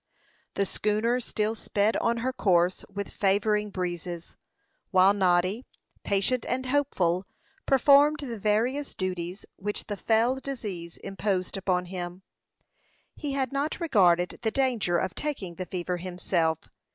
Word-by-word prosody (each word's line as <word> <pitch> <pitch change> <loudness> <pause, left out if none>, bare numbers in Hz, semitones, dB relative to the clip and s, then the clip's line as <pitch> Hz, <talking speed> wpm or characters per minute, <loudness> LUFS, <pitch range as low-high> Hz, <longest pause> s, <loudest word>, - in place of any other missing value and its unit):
The 200 - +1
schooner 215 +5 0
still 220 -2 -1
sped 210 0 0
on 235 0 +1
her 260 - 0
course 180 -5 +2
with 200 0 -5
favoring 210 +1 +2
breezes; 175 -2 -4 0.5
while 190 +1 +5
Noddy, 185 +3 +2 0.4
patient 205 +5 +1
and 260 +1 -1
hopeful, 195 -10 +1 0.4
performed 285 +2 +5
the 235 -6 -5
various 235 +8 0
duties 185 -1 -4
which 205 +2 -3
the 205 - -4
fell 230 +6 +2
disease 205 -12 -6
imposed 195 -1 -2
upon 185 -2 0
him. 180 0 -6 0.9
He 290 -3 -4
had 265 -2 -1
not 280 +2 -1
regarded 180 - +3
the 225 - +1
danger 235 -9 +1
of 185 +1 -1
taking 235 -12 -3
the 180 +2 -6
fever 180 -1 -3
himself. 175 -2 -1
200 Hz, 130 wpm, -27 LUFS, 180-245 Hz, 0.9 s, while